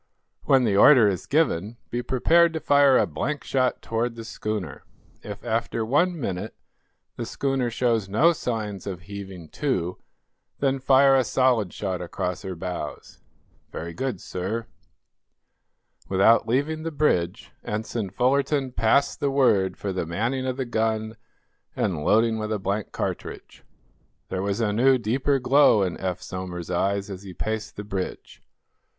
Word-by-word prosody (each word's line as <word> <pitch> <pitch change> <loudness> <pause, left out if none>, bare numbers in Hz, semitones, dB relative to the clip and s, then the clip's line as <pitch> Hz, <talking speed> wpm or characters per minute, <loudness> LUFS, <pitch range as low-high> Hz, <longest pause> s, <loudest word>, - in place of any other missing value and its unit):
When 135 -2 +4
the 105 -4 +1
order 115 +2 +7
is 95 -3 -2
given, 115 - +1
be 120 - -1
prepared 165 +8 +3
to 160 - -2
fire 140 -3 +5
a - - +3
blank 140 - -3
shot 130 -2 0
toward 115 +1 -2
the 115 - -7
schooner. 105 - -5 0.4
If, 105 +2 -9
after 115 0 -1
one 170 +8 +1
minute, 100 -4 -4 0.6
the 120 - -3
schooner 135 -2 -1
shows 115 -4 0
no 150 - +4
signs 110 - -4
of 90 -3 -5
heaving 95 -3 -9
to, 90 - -2 0.6
then 135 -1 0
fire 135 +1 +5
a 130 - +4
solid 120 -6 +2
shot 95 -3 -3
across 90 +1 -4
her 95 -2 -5
bows." 90 -3 -6 0.5
"Very 85 +1 -6
good, 125 0 -3
sir." 100 +7 -4 1.4
Without 100 +4 +4
leaving 145 +7 0
the 165 - -3
bridge 110 - 0
Ensign 110 -1 -3
Fullerton 135 +5 +1
passed 125 +4 +2
the 140 - +1
word 105 -9 +2
for 100 -2 -3
the 90 -3 -3
manning 120 +10 -1
of 130 0 -2
the 130 - -2
gun 110 -1 -1 0.6
and 85 -6 -1
loading 110 +3 +3
with 110 0 -3
a 110 - 0
blank 100 +1 -3
cartridge. - - -5 0.7
There 95 - -2
was 100 +3 -1
a 105 -2 +1
new, 130 +4 +4
deeper 130 +5 0
glow 130 -4 +4
in 90 -3 -2
Eph 95 -2 -3
Somers's 90 -2 -6
eyes 100 +3 0
as 95 -1 -7
he 95 -3 -10
paced 110 +3 -4
the 105 - -6
bridge. 95 -2 -6
110 Hz, 155 wpm, -25 LUFS, 95-130 Hz, 1.4 s, order